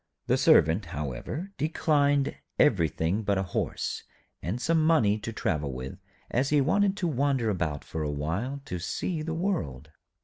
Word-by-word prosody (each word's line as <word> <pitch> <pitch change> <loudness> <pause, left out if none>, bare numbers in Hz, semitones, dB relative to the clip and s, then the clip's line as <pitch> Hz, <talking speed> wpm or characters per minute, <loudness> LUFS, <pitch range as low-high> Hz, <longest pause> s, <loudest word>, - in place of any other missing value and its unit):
The - - +3
Servant, 85 +6 +4
however, 80 - -5
declined 145 -2 +2 0.2
everything 85 - +2
but 100 -2 +1
a 95 - +1
horse, 90 - -2 0.4
and 100 +8 -3
some 160 +4 +2
money 130 -11 +4
to 110 +2 -5
travel 75 -10 -1
with, 65 +1 -7 0.3
as 130 +3 +1
he 150 - +4
wanted 200 +8 +2
to 180 - 0
wander 135 -5 +1
about 80 -7 -2
for 80 - -5
a 75 - -1
while, 95 - -3
to 90 - -4
see 155 - -2
the 160 +1 -3
world. 80 - -2
110 Hz, 160 wpm, -28 LUFS, -, 0.4 s, Servant